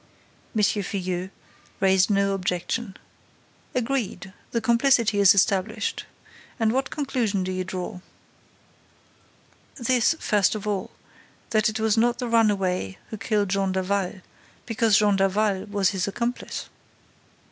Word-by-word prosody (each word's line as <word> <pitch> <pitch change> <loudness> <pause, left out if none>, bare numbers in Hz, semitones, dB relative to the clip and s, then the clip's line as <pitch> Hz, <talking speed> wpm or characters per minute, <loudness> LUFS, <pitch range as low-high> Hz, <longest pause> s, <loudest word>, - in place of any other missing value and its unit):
M. 215 - +2
Filleul 185 -3 -1 0.5
raised 190 0 +4
no 200 -1 +2
objection. 190 +3 -2 0.8
"Agreed. 240 -6 -2 0.2
The 230 - -1
complicity 235 -2 +3
is 200 -1 +7
established. 200 +3 0 0.5
And 220 -1 +2
what 270 +2 0
conclusion 240 -9 -1
do 185 - -3
you 185 0 -2
draw?" 180 -1 -5 1.8
"This, 250 +4 +2
first 210 -1 +2
of 215 - -5
all, 200 -3 -2 0.6
that 215 -1 +3
it 215 - -4
was 220 0 +2
not 235 +1 +3
the 245 - -3
runaway 195 - +1
who 220 - -5
killed 205 -1 0
Jean 195 0 0
Daval, 190 0 -1 0.4
because 225 -3 +3
Jean 205 -2 +3
Daval 195 0 +1
was 205 -2 +1
his 190 -1 -2
accomplice." 235 +5 -3
205 Hz, 125 wpm, -25 LUFS, 190-225 Hz, 1.8 s, is